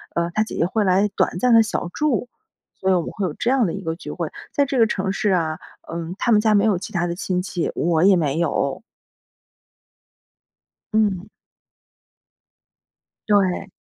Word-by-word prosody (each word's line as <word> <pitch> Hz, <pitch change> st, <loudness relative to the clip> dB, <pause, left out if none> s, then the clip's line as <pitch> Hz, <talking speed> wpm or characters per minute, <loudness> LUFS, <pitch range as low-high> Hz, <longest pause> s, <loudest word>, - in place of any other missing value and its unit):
呃， 170 Hz, 0 st, 0 dB
他 215 Hz, -, +2 dB
姐 -, -, -7 dB
姐 165 Hz, -, +1 dB
会 210 Hz, +3 st, 0 dB
来 195 Hz, +2 st, +3 dB
短 -, -, 0 dB
暂 250 Hz, -1 st, +2 dB
地 225 Hz, -, +7 dB
小 180 Hz, -5 st, -3 dB
住， 255 Hz, -5 st, -1 dB, 0.5 s
所 190 Hz, 0 st, +1 dB
以 -, -, +5 dB
我 175 Hz, -, +2 dB
们 -, -, -5 dB
会 200 Hz, -, -3 dB
有 160 Hz, -, -3 dB
这 240 Hz, -, -2 dB
样 260 Hz, -4 st, +3 dB
的 170 Hz, -, -2 dB
一 195 Hz, -, -5 dB
个 160 Hz, 0 st, -2 dB
聚 -, -, -8 dB
会， -, -, -4 dB, 0.2 s
在 285 Hz, -, +3 dB
这 270 Hz, -1 st, -2 dB
个 225 Hz, -, +6 dB
城 190 Hz, -2 st, -2 dB
市 200 Hz, +1 st, 0 dB
啊， 160 Hz, -3 st, 0 dB, 0.3 s
嗯， 170 Hz, +1 st, -4 dB
他 240 Hz, -, +1 dB
们 210 Hz, -, +6 dB
家 215 Hz, 0 st, +3 dB
没 200 Hz, 0 st, +4 dB
有 205 Hz, -5 st, +2 dB
其 185 Hz, -, -8 dB
他 175 Hz, 0 st, 0 dB
的 170 Hz, -, -3 dB
亲 180 Hz, 0 st, -2 dB
戚， 180 Hz, -2 st, -3 dB
我 165 Hz, 0 st, +1 dB
也 195 Hz, -1 st, +6 dB
没 155 Hz, -3 st, 0 dB
有。 150 Hz, 0 st, -1 dB, 2.1 s
嗯。 210 Hz, -3 st, +1 dB, 2.0 s
对。 195 Hz, -2 st, +2 dB
190 Hz, 205 characters per minute, -22 LUFS, 170-215 Hz, 2.1 s, 地